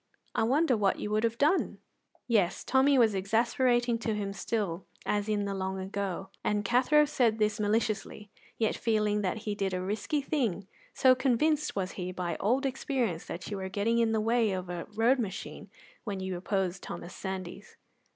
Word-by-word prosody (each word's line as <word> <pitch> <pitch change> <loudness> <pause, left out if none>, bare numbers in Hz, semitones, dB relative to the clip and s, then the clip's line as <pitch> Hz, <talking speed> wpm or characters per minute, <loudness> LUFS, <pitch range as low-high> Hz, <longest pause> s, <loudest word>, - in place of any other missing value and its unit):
I - - 0
wonder 265 +4 +3
what 205 -3 +2
you 210 - -4
would 215 +1 +1
have 230 0 0
done?" 305 +8 +2 0.5
Yes, 205 -7 +1
Tommy 270 +1 +4
was 225 -4 +5
exasperating 235 +4 +2
to 225 -2 -1
him 200 -1 -3
still 195 -4 -2 0.2
as 205 0 0
in 205 -1 0
the 200 - -2
long 190 0 -3
ago, 190 0 -4
and 205 -1 0
Cathro 260 +7 +4
said 245 -7 +2
this 210 -1 +1
maliciously, 210 -1 -1 0.3
yet 220 -2 +1
feeling 210 -2 +1
that 190 +1 -1
he 210 - -1
did 195 -2 -1
a - - -1
risky 215 +10 -1
thing, 230 - -1 0.3
so 260 -1 +6
convinced 275 +4 +1
was 190 -2 -2
he 180 -1 -5
by 180 -2 -3
old 250 +7 +1
experience 255 - -1
that 175 +4 -7
you 205 - -2
were 190 -1 -4
getting 215 +4 +1
in 230 -1 +3
the 220 - +1
way 225 +1 +2
of 185 -1 -4
a 175 -1 -4
road 240 +4 +3
machine 200 -5 -5 0.3
when 200 -4 -4
you 190 -1 -3
opposed 190 0 -1
Thomas 175 - -7
Sandys. 190 +1 -6
210 Hz, 180 wpm, -30 LUFS, 190-240 Hz, 0.5 s, so